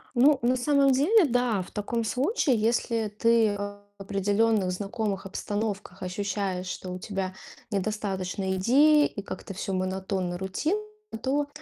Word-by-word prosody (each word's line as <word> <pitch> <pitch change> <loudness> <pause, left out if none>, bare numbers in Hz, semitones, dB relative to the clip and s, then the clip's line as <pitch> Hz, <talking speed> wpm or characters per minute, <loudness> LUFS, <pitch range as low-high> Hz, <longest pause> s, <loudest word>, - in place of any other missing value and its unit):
Ну, 275 +3 +6
на 250 +2 +3
самом 275 +1 +3
деле, 340 - +5
да. 245 -6 +1
В - - -15
таком 225 +2 -2
случае, 270 - +1
если 225 0 +1
ты 220 0 +2
в 205 0 -5 0.2
определённых 200 0 +1
знакомых 200 +1 -3
обстановках 205 -1 -4
ощущаешь, 190 -1 -2
что 180 0 -5
у 180 - -5
тебя 190 -1 -3 0.4
недостаточно 195 -2 -2
идей 295 +9 +5
и 200 - -7
как-то 190 0 -7
всё 195 0 -3
монотонно, 185 -1 -2
рутинно, 190 - -1 0.4
то, 285 +2 0
205 Hz, 135 wpm, -27 LUFS, 190-245 Hz, 0.4 s, Ну